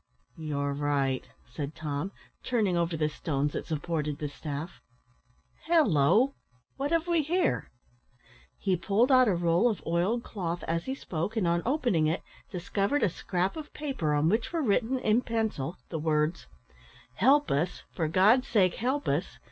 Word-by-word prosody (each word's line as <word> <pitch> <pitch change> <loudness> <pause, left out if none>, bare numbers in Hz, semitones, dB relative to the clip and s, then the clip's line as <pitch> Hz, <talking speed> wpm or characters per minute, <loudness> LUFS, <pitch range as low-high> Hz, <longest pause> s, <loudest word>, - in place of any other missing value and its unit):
"You 155 -3 -4
are 140 0 0
right," 140 -2 0 0.2
said 145 +3 -6
Tom, 150 +4 -3 0.3
turning 215 -7 +1
over 170 -1 0
the 155 0 +1
stones 145 -1 -2
that - - -4
supported 150 -1 -2
the 150 -2 -4
staff 145 +3 -6 0.9
"halloo! 250 - +4 0.4
what 275 +2 -2
have 330 0 +1
we 340 -2 +3
here?" 295 - 0 0.9
He 190 -2 +1
pulled 200 +9 +2
out 255 -1 +6
a 195 - +3
roll 170 +6 +3
of 215 - -2
oiled 180 +8 +1
cloth 175 -4 -4
as 165 0 -2
he 265 - -2
spoke, 175 - -4
and, 190 -5 +2
on 170 0 +2
opening 240 - +2
it, 160 - -1 0.3
discovered 200 +8 -1
a 205 - +4
scrap 180 +2 -2
of 310 -2 -8
paper, 260 - -1
on 145 +2 +2
which 220 +6 +1
were 335 -2 -1
written, 240 +3 +1
in 225 -1 +2
pencil, 220 - -2
the 160 - -3
words, 155 +1 0 0.7
"_Help 285 +4 +4
us! 160 +6 -1
for 165 -3 -1
God's 210 +10 +4
sake 190 -5 +3
help 265 +5 -1
us! - - -1
180 Hz, 165 wpm, -29 LUFS, 155-240 Hz, 0.9 s, out